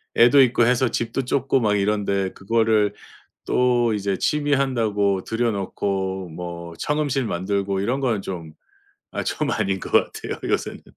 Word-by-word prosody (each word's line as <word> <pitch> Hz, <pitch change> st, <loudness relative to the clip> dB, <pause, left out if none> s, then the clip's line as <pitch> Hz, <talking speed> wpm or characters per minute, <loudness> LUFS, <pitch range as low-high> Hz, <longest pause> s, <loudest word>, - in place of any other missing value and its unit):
애도 120 Hz, +4 st, +7 dB
있고 125 Hz, -2 st, +4 dB
해서 125 Hz, +1 st, +3 dB
집도 120 Hz, +4 st, -2 dB
좁고 135 Hz, +1 st, +1 dB
막 105 Hz, -4 st, +2 dB
이런데 100 Hz, -1 st, 0 dB
그거를 110 Hz, 0 st, +1 dB, 0.5 s
또 120 Hz, -2 st, +2 dB
이제 100 Hz, -1 st, -1 dB
취미 145 Hz, -1 st, 0 dB
한다고 110 Hz, -8 st, +1 dB
들여놓고 100 Hz, -4 st, -2 dB
뭐 85 Hz, 0 st, -7 dB
청음실 145 Hz, -, -1 dB
만들고 100 Hz, +1 st, -1 dB
이런 125 Hz, +7 st, -1 dB
거는 120 Hz, -6 st, 0 dB
좀 85 Hz, -5 st, -6 dB, 0.6 s
아 -, -, -2 dB
좀 -, -, -2 dB
아닌 95 Hz, 0 st, 0 dB
것 -, -, -8 dB
같아요, -, -, 0 dB
요새는. -, -, -2 dB
105 Hz, 285 characters per minute, -23 LUFS, 95-125 Hz, 0.6 s, 애도